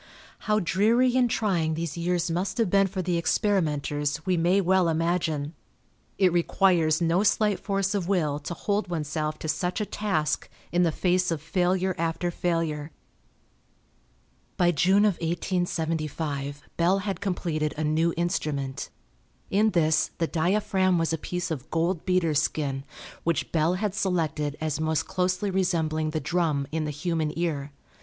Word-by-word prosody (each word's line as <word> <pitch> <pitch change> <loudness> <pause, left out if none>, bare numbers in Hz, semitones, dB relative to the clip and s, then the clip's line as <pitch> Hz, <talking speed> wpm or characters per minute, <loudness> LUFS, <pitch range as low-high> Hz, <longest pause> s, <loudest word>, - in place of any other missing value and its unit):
How 210 0 +4
dreary 225 +7 +3
and 250 -2 +3
trying 175 -9 0
these 165 -2 -3
years 175 0 0
must 185 +3 -2
have 225 -6 +1
been 195 0 +4
for 190 -1 -4
the 175 -1 0
experimenters 150 -5 0
we 185 -1 +2
may 175 +3 +3
well 185 -2 +3
imagine. 165 -2 0 0.6
It 185 -3 +3
requires 170 -2 +3
no 170 +2 +2
slight 210 -1 +2
force 195 -1 -1
of 195 -4 -1
will 155 -7 +1
to 160 +4 -6
hold 205 +2 -1
oneself 155 -2 -2
to - - -6
such 180 +5 -1
a 210 - 0
task 175 -9 -1 0.2
in 175 - +2
the 170 -2 +3
face 180 +2 +1
of 165 -2 -1
failure 185 +3 0
after 165 +1 -1
failure. 165 -4 -1 1.7
By 175 -1 +4
June 190 +6 +4
of 205 -5 +2
1875 160 -4 -2
Bell 175 +3 +3
had 195 -2 -3
completed 165 -6 -1
a 155 - -1
new 160 +2 +2
Instrument. 140 -5 -2 0.6
In 210 +3 +4
this 160 -5 +2
the 165 - +1
diaphragm 185 +2 +1
was 165 0 0
a - - 0
piece 180 +2 -3
of 145 -3 -5
gold 165 +1 0
beater's 165 -5 +2
skin, 140 -3 -2 0.4
which 170 -3 -1
Bell 165 +2 +2
had 205 +1 -1
selected 160 -7 -1
as 155 -1 -2
most 160 0 0
closely 185 +2 -1
resembling 160 -4 0
the 155 0 -2
drum 155 -5 0
in 160 0 -1
the - - -2
human 155 +1 -1
ear. 150 -5 -2
170 Hz, 155 wpm, -26 LUFS, 155-185 Hz, 1.7 s, How